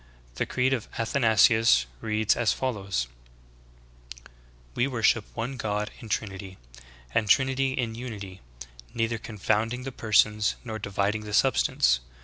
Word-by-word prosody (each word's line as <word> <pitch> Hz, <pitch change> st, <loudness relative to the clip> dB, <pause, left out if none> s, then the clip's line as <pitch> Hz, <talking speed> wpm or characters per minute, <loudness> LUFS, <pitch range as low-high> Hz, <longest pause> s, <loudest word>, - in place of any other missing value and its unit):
The -, -, -2 dB
"Creed 130 Hz, +1 st, +1 dB
of 115 Hz, -4 st, -2 dB
Athanasius" 110 Hz, -, +4 dB
reads 110 Hz, -, +1 dB
as 120 Hz, -3 st, +2 dB
follows: 100 Hz, -, -2 dB, 1.1 s
19. -, -, -19 dB, 0.4 s
"We 120 Hz, -, +1 dB
worship 115 Hz, -4 st, +2 dB
one 125 Hz, +4 st, -4 dB
God 105 Hz, -2 st, -2 dB
in 115 Hz, -, -10 dB
Trinity, 95 Hz, -3 st, -4 dB, 0.6 s
and 105 Hz, -2 st, +1 dB
Trinity 135 Hz, +3 st, +3 dB
in 120 Hz, -3 st, -2 dB
Unity, 105 Hz, -6 st, -8 dB, 0.5 s
neither 115 Hz, 0 st, -1 dB
confounding 110 Hz, +3 st, -1 dB
the 135 Hz, -, -5 dB
persons, 105 Hz, -2 st, +2 dB
nor 110 Hz, -3 st, -5 dB
dividing 100 Hz, +1 st, -1 dB
the 105 Hz, 0 st, -2 dB
substance. 65 Hz, -, +3 dB
110 Hz, 130 wpm, -27 LUFS, 105-120 Hz, 1.1 s, Athanasius